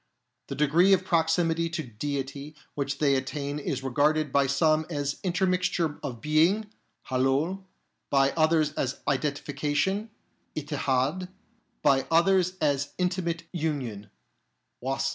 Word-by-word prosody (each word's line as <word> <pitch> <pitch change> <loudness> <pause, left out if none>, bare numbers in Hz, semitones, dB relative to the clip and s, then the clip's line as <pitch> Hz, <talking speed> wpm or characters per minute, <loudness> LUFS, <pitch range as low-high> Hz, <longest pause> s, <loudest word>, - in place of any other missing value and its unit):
The - - -5
degree 165 +7 +4
of 190 - +2
proximity 165 0 +1
to 165 -1 -3
Deity 140 +4 -5 0.2
which 140 -1 -2
they 145 -2 +3
attain 140 +2 -2
is 135 -2 -3
regarded 145 +3 +1
by 140 0 +3
some 155 +3 +2
as 145 -3 -2
intermixture 180 -4 0
of 125 -6 -6
being 175 +8 +2 0.4
(haloul), 140 +9 +1 0.4
by 135 -1 +3
others 155 -1 +2
as 130 -3 -3
identification 145 - -1 0.5
(ittihad), 145 +3 -1 0.5
by 135 -1 +3
others 180 +2 +3
as 145 -2 0
intimate 180 -2 -1
union 135 - -3 0.7
(wasl). 135 +1 0
150 Hz, 115 wpm, -27 LUFS, 140-170 Hz, 0.7 s, degree